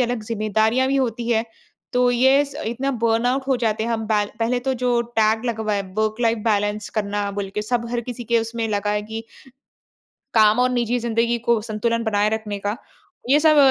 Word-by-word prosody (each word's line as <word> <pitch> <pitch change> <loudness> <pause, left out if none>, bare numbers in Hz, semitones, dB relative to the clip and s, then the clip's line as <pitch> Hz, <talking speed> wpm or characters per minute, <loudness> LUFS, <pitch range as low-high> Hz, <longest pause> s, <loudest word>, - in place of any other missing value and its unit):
अलग 245 -2 0
ज़िम्मेदारियाँ 220 +3 +1
भी 275 - +1
होती 235 -2 -1
हैं, 225 -1 +2 0.5
तो 250 0 +3
ये 265 +4 +4
स 280 - -11
इतना 250 +5 -1
बर्नआउट 240 +4 +2
हो 265 - +3
जाते 220 -2 0
हैं 235 - -2
हम 225 -1 -2
बै 210 -1 +2
पहले 235 +2 +1
तो 265 +1 -1
जो 245 -1 +1 0.2
टैग 220 +1 +2
लगवाया 220 -4 -1
वर्क-लाइफ 220 +1 +1
बैलेंस 205 -1 0
करना 205 -1 -1
बोल 200 0 -4
के 210 - -1
सब 235 +2 -1
हर 240 0 -1
किसी 245 0 -5
के 235 +1 +2
उसमें 225 0 -2
लगा 205 -1 -1
है 210 0 0
कि 220 +1 -6 1.1
काम 215 0 +5
और 255 - +3
निजी 245 -1 0
ज़िंदगी 235 0 0
को 235 -1 +1
संतुलन 230 +1 -1
बनाए 210 -1 +2
रखने 215 -2 -4
का। 205 +2 -3 0.5
ये 290 +2 +5
सब 310 -1 +5
230 Hz, 195 wpm, -22 LUFS, 215-245 Hz, 1.1 s, काम